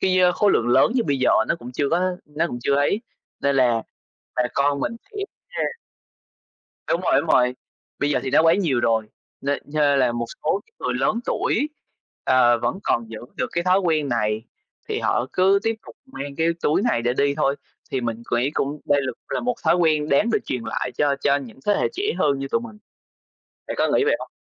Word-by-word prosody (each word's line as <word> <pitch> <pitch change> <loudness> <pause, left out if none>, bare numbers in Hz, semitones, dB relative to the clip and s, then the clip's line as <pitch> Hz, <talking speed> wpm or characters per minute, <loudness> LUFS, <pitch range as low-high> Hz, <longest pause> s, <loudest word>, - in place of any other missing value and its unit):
cái, 185 -1 +2
ơ, 180 -1 +5
khối 205 +2 +3
lượng 120 +1 +2
lớn 130 - +4
như 245 -3 +2
bây 140 -2 0
giờ 130 - +3 0.2
nó - - +2
cũng 125 +1 -9
chưa 140 +2 0
có 180 +1 +1
nó 150 +3 -1
cũng 120 - -5
chưa 140 - +2
ấy, 145 +9 +2 0.4
nên 140 -1 +1
là 120 -3 +3 0.5
bà 125 - +3
con 140 0 +2
mình 230 - -2
sẽ 420 - -13 0.3
nh 485 - -2 1.1
Đúng 170 - +1
rồi, 175 -6 +3
đúng 160 - -7
rồi. 125 0 +4 0.4
Bây 145 +1 0
giờ - - +1
thì 130 - -3
nó 155 +3 +5
quá 165 0 +5
nhiều 155 -11 +1
rồi, 115 -2 +1 0.3
nên 140 0 -1
nên 145 -1 +2
là 125 -2 +3
một 120 0 -2 0.2
số 195 +6 +1
những - - -33
người 125 - 0
lớn 135 - +1
tuổi, 290 +6 0 0.6
ờ, 120 -2 +4
vẫn 190 - -1
còn 115 -1 0
giữ 110 - -6 0.2
được - - 0
cái 170 +1 -1
thói 185 +1 +4
quen 160 -6 +1
này 110 -2 0 0.5
thì - - -1
họ 120 - +1
cứ 190 +2 +4
tiếp 225 0 0
tục - - -12
mang 140 - -7
cái 165 +1 +2
túi 155 +7 +2
này 120 - +1
để 120 0 +1
đi 140 0 +2
thôi. 140 -2 +1 0.3
Thì 130 - -1
mình 115 -1 -3
quỹ 120 +4 +1
cũng 145 +2 -2
đây 145 0 +4
là 130 - -2 0.2
là - - -1
một 245 0 0
thói 165 +2 +4
quen 155 -3 +2
đáng 210 +12 +3
được 215 - +3
truyền 125 -2 -3
lại 120 +2 -2
cho 145 -1 +2
cho 140 0 +3
những 130 -4 -8
thế 205 - +4
hệ - - +2
trẻ 395 - -4 0.2
hơn 140 -2 +2
như 135 0 -4
tụi 230 - +1
mình. 220 -3 -10 0.9
Bạn - - -4
có - - +3
nghĩ 425 - +3
vậy 455 - +3
hông? - - -9
145 Hz, 230 wpm, -23 LUFS, 125-180 Hz, 1.1 s, ơ